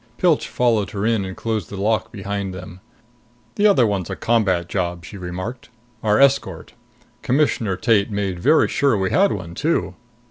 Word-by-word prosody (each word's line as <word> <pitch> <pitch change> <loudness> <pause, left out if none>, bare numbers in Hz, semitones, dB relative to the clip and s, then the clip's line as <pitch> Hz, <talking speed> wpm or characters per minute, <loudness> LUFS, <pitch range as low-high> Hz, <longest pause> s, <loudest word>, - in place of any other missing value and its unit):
Pilch 170 -5 +2
followed 115 -6 +1
her 100 0 -3
in 115 -3 +1
and 95 0 -7
closed 110 -6 -3
the 100 - -7
lock 110 +1 0
behind 100 -1 -4
them. 90 0 -10 0.7
"The 210 0 +3
other 180 - +4
one's 100 -5 -2
a - - -3
combat 95 -7 +1
job," 85 -2 -3
she 90 - -10
remarked. 90 +7 -6 0.3
"Our 105 -1 +2
escort. 135 -11 +1 0.5
Commissioner 125 -7 +1
Tate 105 0 +2
made 100 -4 -2
very 150 - +4
sure 135 -6 +1
we 95 -1 -1
had 195 +1 +3
one, 85 -3 -5
too!" 155 - -1
100 Hz, 170 wpm, -21 LUFS, 95-120 Hz, 0.7 s, other